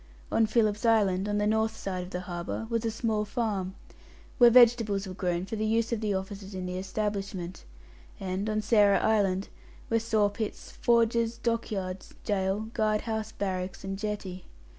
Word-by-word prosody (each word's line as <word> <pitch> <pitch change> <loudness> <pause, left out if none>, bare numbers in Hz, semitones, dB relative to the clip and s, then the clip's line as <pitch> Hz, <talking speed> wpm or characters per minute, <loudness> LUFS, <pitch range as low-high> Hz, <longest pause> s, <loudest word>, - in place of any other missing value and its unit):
On 225 - +3
Philip's 215 -1 +1
Island, 205 -4 +3
on 205 - 0
the 205 - +1
north 220 +1 +1
side 185 -2 -3
of - - -10
the 180 -1 -4
harbour, 175 +4 -4
was 230 0 0
a - - +2
small 220 -1 -1
farm, 205 -4 -2 0.6
where 240 -1 +9
vegetables 230 -4 +5
were 185 - -6
grown 180 -1 -1
for 220 - -4
the 215 - -2
use 225 +1 +1
of 225 - -2
the 210 -2 0
officers 195 +1 -5
of 185 -1 -4
the 180 0 -3
establishment; 195 -2 -3 0.6
and, 190 +2 -2
on 215 0 0
Sarah 210 -2 +5
Island, 200 -3 +1 0.4
were 230 - +4
sawpits, 215 -1 -1
forges, 235 0 +2
dockyards, 205 -6 -3
gaol, 195 -1 0
guard 215 -1 +1
house, 220 -1 -3
barracks, 185 -3 -3
and 195 0 -4
jetty. 205 -4 -4
210 Hz, 165 wpm, -29 LUFS, 190-220 Hz, 0.6 s, where